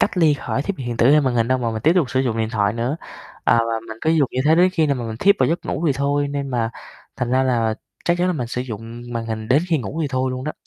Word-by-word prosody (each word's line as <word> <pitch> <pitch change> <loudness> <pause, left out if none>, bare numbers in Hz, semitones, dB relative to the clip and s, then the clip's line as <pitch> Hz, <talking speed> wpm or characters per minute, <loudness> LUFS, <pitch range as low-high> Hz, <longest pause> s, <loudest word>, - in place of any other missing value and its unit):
cách - - +1
ly 160 -4 +5
khỏi 135 -1 -3
thiết 200 +5 -3
bị 135 - -6
hiện 120 -1 -3
tử, 120 +3 +4
hay 150 +1 +6
màn 130 -4 0
hình 115 0 +1
đâu, 130 - +2
mà 120 -2 -1
mình 110 -1 -4
tiếp 160 - +5
tục 165 -9 +2
sử 130 - +1
dụng 120 -4 -1
điện 110 0 -1
thoại 105 -3 +1
nữa. 120 +6 -2 0.5
À, - - +4
và 115 -1 0
mình 110 0 -8
cứ 160 - +1
dùng 155 -5 +3
như 130 - -2
thế 155 +2 +5
đến 180 +2 +4
khi 160 -4 +2
nào 140 - +1
mà 120 - -4
mình 110 -1 -5
thiếp 200 - +4
vào - - +3
giấc 170 +2 -1
ngủ 170 - -3
thì 145 - +3
thôi, 140 +1 0
nên 140 -1 -3
mà 120 -3 -1 0.5
thành 125 -1 -2
ra 130 +1 +3
là 115 -4 +1 0.3
chắc 175 0 +1
chắn 180 - +2
là 185 - +1
mình 130 -8 -3
sử 125 +1 -3
dụng 115 -1 -7
màn 115 -1 -3
hình 110 -1 -4
đến 145 +5 +4
khi 160 -3 +2
ngủ 125 +7 -5
thì 150 - -1
thôi 130 -1 -1
luôn 130 +1 -5
đó. 155 - -2
130 Hz, 325 wpm, -21 LUFS, 115-150 Hz, 0.5 s, hay